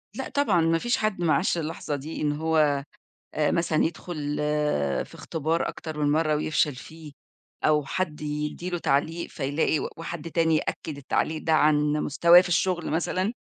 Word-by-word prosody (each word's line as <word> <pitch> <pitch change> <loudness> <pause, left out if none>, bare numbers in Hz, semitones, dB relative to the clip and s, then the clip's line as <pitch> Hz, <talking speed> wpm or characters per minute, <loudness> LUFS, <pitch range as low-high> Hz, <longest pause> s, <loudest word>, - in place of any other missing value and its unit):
لأ، - - -4
طبعًا 210 -12 +2
ما 165 0 +3
فيش 240 +8 0
حد 215 -4 -1
ما 165 -2 +3
عاشْش 180 -1 +1
اللحظة 155 -2 -3
دي، 150 +4 -6
إن 150 -1 +1
هو 150 -2 +1 0.5
آآ 150 -1 +2
مثلًا 165 -2 +1
يدخل 155 -3 -4 0.7
في - - -17
إختبار 160 +1 -2
أكتر 155 -2 -7
من 145 -1 +2
مرّة، 155 -1 +2
ويفشل 150 -2 +1
فيه، 155 +2 -11 0.5
أو 150 -2 +3
حد 155 0 -3
يدّي 150 +4 -4
له 175 - -2
تعليق، 160 +4 0
فيلاقي 145 +2 0
و - - -3
وحد 165 0 -6
تاني 165 -1 +2
يأكد 155 0 -3
التعليق 155 +3 -1
ده 160 - 0
عن 150 -1 +3
مستواه 170 +4 +5
في 185 - -3
الشُغل 175 0 0
مثلًا، 185 +6 0
160 Hz, 170 wpm, -26 LUFS, 150-170 Hz, 0.7 s, مستواه